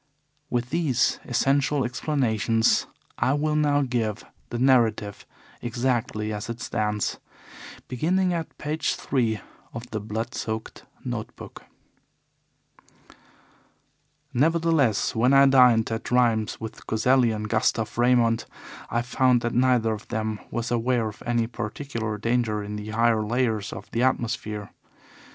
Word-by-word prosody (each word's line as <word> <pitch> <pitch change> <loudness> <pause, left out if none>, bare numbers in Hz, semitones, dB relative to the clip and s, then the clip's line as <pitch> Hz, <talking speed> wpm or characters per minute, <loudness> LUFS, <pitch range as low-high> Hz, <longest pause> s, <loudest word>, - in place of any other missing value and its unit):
With 120 0 -2
these 150 -7 +1
essential 135 +2 +1
explanations 120 -4 +1 0.3
I 130 - +2
will 150 +1 0
now 145 -1 +3
give 115 -4 -2 0.2
the 120 - -3
narrative 115 -5 +2 0.3
exactly 120 -3 -1
as 105 +2 -5
it 115 0 -5
stands, 105 -3 -2 0.7
beginning 180 +9 +1
at 165 -1 -4
page 155 +1 -1
three 115 -7 -1 0.3
of 120 +1 -6
the 110 - -2
blood 110 +4 -4
soaked 110 0 -5 0.2
note - - -4
book: - - -11 2.7
"Nevertheless, 160 -5 +2
when 125 +4 +3
I 135 0 +7
dined 125 -5 +5
at 115 +1 -3
Rheims 115 -3 +2
with 110 -1 -8
Coselli 125 +2 +3
and 105 -1 -3
Gustav 110 0 0
Raymond 120 -1 +3 0.4
I 120 0 0
found 125 0 +2
that 120 0 -2
neither 125 -3 +3
of 105 - -8
them 110 -2 -2
was 120 +1 -3
aware 120 -1 +1
of 105 - -13
any 120 -1 +1
particular 110 -1 -4
danger 115 -1 0
in 105 +1 -6
the 105 0 -6
higher 115 0 +2
layers 115 -1 -1
of - - -9
the 115 - -1
atmosphere. 115 -5 -1
120 Hz, 130 wpm, -25 LUFS, 110-130 Hz, 2.7 s, I